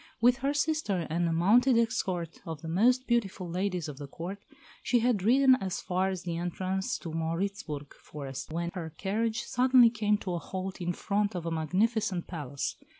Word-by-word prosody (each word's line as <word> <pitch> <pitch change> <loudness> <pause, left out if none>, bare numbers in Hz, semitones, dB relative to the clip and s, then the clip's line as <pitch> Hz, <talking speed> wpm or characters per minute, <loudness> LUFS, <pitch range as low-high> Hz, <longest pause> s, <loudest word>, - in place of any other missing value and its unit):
With 245 +1 +5
her 270 +1 0
sister 290 - 0
and 170 +1 +1
a - - 0
mounted 230 +10 +4
escort 185 -7 -1
of 160 -2 -7
the - - -5
most 245 +10 +3
beautiful 205 -7 0
ladies 180 -1 -2
of 145 -2 -8
the 145 - -6
Court, 175 +8 -6 0.4
she 245 - +2
had 235 -4 +2
ridden 260 +6 +6
as 190 -2 -2
far 185 +1 0
as 185 -2 -4
the 170 -2 -3
entrance 185 +2 -2
to 165 - -7
the - - -5
Mauritzburg 165 -3 -3
forest, 140 -1 -8
when 170 +1 -2
her 165 -4 -6
carriage 220 +5 -1
suddenly 250 -2 +5
came 210 -2 +1
to 185 -3 -4
a 170 - -1
halt 190 +1 -5
in 175 0 -1
front 205 +2 -1
of 175 -2 -4
a 165 - -2
magnificent 185 +4 0
palace. 145 -5 -4
190 Hz, 190 wpm, -29 LUFS, 170-225 Hz, 0.4 s, ridden